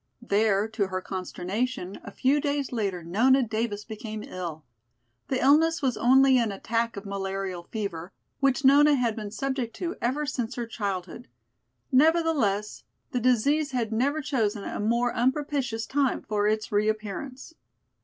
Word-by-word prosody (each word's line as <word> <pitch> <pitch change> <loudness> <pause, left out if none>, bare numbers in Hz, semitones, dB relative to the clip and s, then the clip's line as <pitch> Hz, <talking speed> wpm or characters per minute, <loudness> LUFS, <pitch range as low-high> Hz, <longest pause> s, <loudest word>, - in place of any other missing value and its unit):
There, 210 -2 +2
to 220 -3 -1
her 185 0 -3
consternation, 190 +3 -4
a - - -8
few 270 +7 +1
days 285 -2 -1
later 200 -7 -2
Nona 250 +10 +3
Davis 220 -2 -3
became 215 -1 -6
ill. 170 -6 -6 0.6
The 260 - 0
illness 315 +4 +4
was 255 -4 +1
only 260 +3 +5
an 230 -3 0
attack 230 +3 -2
of 200 - -7
malarial 195 -2 -3
fever, 180 -3 -5 0.3
which 275 -1 +2
Nona 290 +2 +7
had 240 -4 0
been 210 -2 -5
subject 255 +1 -3
to 350 -1 -4
ever 270 +5 0
since 250 -5 -3
her 240 - -3
childhood; 200 0 -4 0.6
nevertheless, 275 -8 +2 0.3
the 250 - 0
disease 270 +5 +2
had 235 -3 -1
never 280 +7 +1
chosen 225 -7 -1
a - - -5
more 235 +3 +1
unpropitious 260 -2 0
time 275 -1 0
for 210 -1 0
its 215 0 -1
reappearance. 215 +7 -2
230 Hz, 145 wpm, -27 LUFS, 205-265 Hz, 0.6 s, Nona